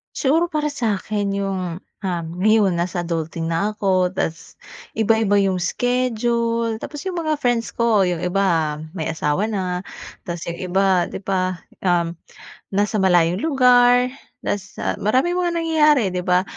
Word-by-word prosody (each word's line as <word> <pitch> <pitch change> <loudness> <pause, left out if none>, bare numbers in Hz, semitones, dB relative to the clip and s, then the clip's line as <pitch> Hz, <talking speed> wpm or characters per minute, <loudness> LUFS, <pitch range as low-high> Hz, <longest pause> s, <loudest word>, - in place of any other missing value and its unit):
Siguro, 320 +5 +2
para 300 -2 -1
sa'kin 210 -5 -1
yung, 190 -3 -3 0.2
ah, 180 -4 -2 0.2
yon 205 -4 +3
nasa 175 0 -2
adulting 165 0 -3
na 205 +6 0
ako 185 -2 +1
tas, 165 -2 -4 0.4
iba-iba 220 -2 +2
yung 190 -2 0
schedule, 235 +1 0
tapos 295 -1 -7
yung 365 -2 -3
mga 310 -2 0
friends 240 -5 -1
ko, 220 -5 +3
yung 175 -1 -2
iba 170 -5 +1 0.2
may 165 -1 -2
asawa 155 +4 0
na, 185 -4 -2 0.4
tas 170 -1 -5
yung 170 - -3 0.2
iba 190 -2 +3
'di - - -5
ba? 185 -2 -1 0.2
Um, 175 -2 +1 0.6
nasa 205 +3 0
malayong 180 - +3
lugar, 250 -4 +5 0.4
tas, 205 0 -4
ah, - - -1
maraming 260 - +1
mga 350 -1 +1
nangyayari, 305 -5 +3
'di 180 - -1
ba? 180 +1 +3
200 Hz, 145 wpm, -21 LUFS, 180-240 Hz, 0.6 s, lugar